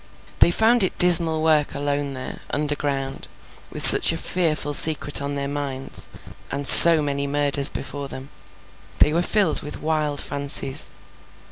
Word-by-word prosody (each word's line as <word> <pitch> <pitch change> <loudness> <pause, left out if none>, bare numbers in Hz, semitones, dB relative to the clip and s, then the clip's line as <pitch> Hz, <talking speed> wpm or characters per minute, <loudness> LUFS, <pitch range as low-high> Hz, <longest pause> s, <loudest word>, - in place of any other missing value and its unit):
They - - +2
found 225 +6 -1
it 190 - -1
dismal 165 -3 +2
work 155 -2 -2
alone 145 0 -6
there, 130 -1 -11
underground, 145 -2 -6 0.4
with - - +2
such - - +6
a - - -7
fearful 155 -5 -4
secret 145 -1 +2
on 140 0 -7
their 140 0 -6
minds, 140 -2 -5 0.4
and 140 +1 -8
so 165 +2 +9
many 140 -1 -6
murders 145 0 +2
before 140 -1 -10
them. 135 0 -12 0.7
They 150 - 0
were 170 - -2
filled 190 -2 -3
with 150 - -10
wild 150 -2 -5
fancies. 140 -1 0
145 Hz, 145 wpm, -18 LUFS, 140-160 Hz, 0.7 s, so